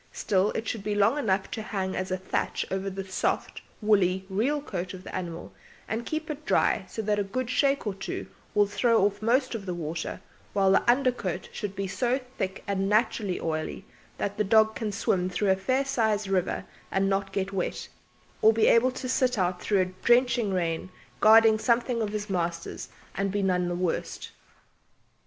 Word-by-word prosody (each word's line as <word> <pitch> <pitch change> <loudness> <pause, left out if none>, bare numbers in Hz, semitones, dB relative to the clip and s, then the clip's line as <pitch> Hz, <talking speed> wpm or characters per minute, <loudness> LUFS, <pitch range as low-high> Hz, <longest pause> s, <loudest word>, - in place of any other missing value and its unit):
Still, 195 0 +1
it 225 - -3
should 220 - -3
be 210 0 -1
long 205 +8 +3
enough 195 -6 0
to 220 - -3
hang 190 -3 -3
as 185 0 -2
a 185 - 0
thatch 185 - -2
over 195 +1 -1
the 195 0 -5
soft, 190 - -2 0.2
woolly 190 -3 +3
real 255 +10 +1
coat 185 -9 -5
of 185 - -11
the - - -9
animal 170 -3 -5 0.3
and 225 +2 -3
keep 315 0 -3
it 300 0 -7
dry 190 -9 +2
so 220 - -4
that 210 0 +1
a - - +2
good 250 +5 -3
shake 280 -1 +2
or 205 - -1
two 190 - -5 0.3
will 205 - +5
throw 225 +1 +3
off 205 0 -1
most 255 +4 +2
of 205 -4 -5
the 180 - -2
water; 165 0 -4 0.3
while 195 -1 +3
the 195 - +3
under 255 +1 +2
coat 185 -7 -4
should 200 -2 -5
be 195 - -2
so 245 +7 0 0.2
thick 190 0 -3
and 195 -1 -1
naturally 210 -3 +1
oily 160 +4 -3 0.3
that 200 +1 -3
the - - +4
dog 220 +2 +4
can 220 -2 -3
swim 185 -3 0
through 195 +1 +1
a - - +4
fair 255 +8 0
sized 220 -6 +1
river 190 -2 0 0.2
and 195 0 +1
not 195 0 0
get 195 0 -2
wet, 185 -2 -2 0.5
or 220 - +7
be 220 0 +2
able 230 +2 +5
to 255 0 -5
sit 255 -1 +1
out 180 -1 0
through 200 -3 +2
a - - +2
drenching 235 +4 +2
rain 170 -1 -1 0.3
guarding 220 0 +7
something 235 0 +1
of 215 - -1
his 210 0 -4
master's 170 -3 -3 0.2
and 195 0 -1
be 205 0 -1
none 180 -2 +1
the 175 - -2
worse. 175 -1 -3
200 Hz, 195 wpm, -27 LUFS, 190-225 Hz, 0.5 s, or